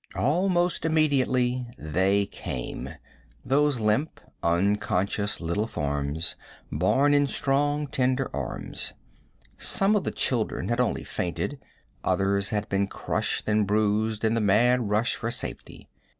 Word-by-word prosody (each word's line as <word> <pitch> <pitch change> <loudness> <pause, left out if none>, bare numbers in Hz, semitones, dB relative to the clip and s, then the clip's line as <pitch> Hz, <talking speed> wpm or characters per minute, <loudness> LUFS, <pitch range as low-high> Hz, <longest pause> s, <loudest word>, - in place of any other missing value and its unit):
Almost 175 +4 +1
immediately 130 -6 +2
they 95 +6 +1
came 65 -9 -6 0.6
those 145 -1 +2
limp, 110 +8 0 0.2
unconscious 100 +3 +1
little 85 +6 -1
forms 75 0 -1 0.4
borne 145 +2 +3
in 145 0 +4
strong, 145 +2 0
tender 130 -1 0
arms. 70 -4 -3 0.7
Some 195 +2 +4
of 205 - +1
the - - -1
children 115 -3 -1
had 120 +1 0
only 125 -3 0
fainted; 90 +10 -3 0.4
others 100 +1 +1
had 105 -2 -2
been 100 0 0
crushed - - -2
and 105 -1 +2
bruised 105 +1 +1
in 110 - +2
the 115 - +1
mad 115 +3 +3
rush 110 +4 +2
for 115 - -3
safety. - - -6
110 Hz, 120 wpm, -26 LUFS, 100-135 Hz, 0.7 s, in